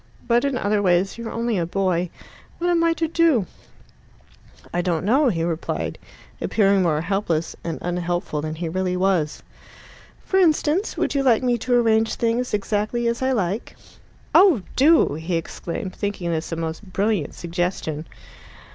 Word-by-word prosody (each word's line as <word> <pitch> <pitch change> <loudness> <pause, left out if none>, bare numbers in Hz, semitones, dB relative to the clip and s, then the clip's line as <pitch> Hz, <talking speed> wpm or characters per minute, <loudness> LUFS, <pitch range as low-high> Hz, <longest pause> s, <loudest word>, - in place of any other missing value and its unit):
But 240 0 +3
in 275 -2 0
other 205 -2 +1
ways 185 +3 +1
you're 230 -1 -5
only 230 -3 -1
a 170 - 0
boy. 180 -1 0 0.5
What 350 +1 0
am 335 -1 +3
I 335 0 +3
to 330 0 -1
do?" 320 - +3 1.3
"I 175 - +1
don't 175 -1 -1
know," 265 +7 +4
he 165 -6 -1
replied, 165 -1 -3 0.4
appearing 200 -2 +3
more 155 -4 +1
helpless 170 -3 -1
and 165 -1 -3
unhelpful 175 -3 -2
than 155 +1 -4
he 170 +1 -4
really 180 +2 -1
was. 180 -5 0 0.8
"For 380 - +2
instance, 330 +2 +2
would - - 0
you 280 - +1
like 255 -3 +3
me 245 -1 +1
to 245 +3 +1
arrange 225 -2 +3
things 235 +2 0
exactly 210 +3 -1
as 235 +1 -1
I 260 0 +1
like?" 200 -1 -2 0.6
"Oh 340 - +6
do!" 300 - +5
he 160 +4 -3
exclaimed, 170 +3 -5
thinking 200 -4 -3
this 160 0 -3
a - - -1
most 160 -1 -4
brilliant 195 -3 -1
suggestion. 170 -3 -3
195 Hz, 160 wpm, -22 LUFS, 170-240 Hz, 1.3 s, Oh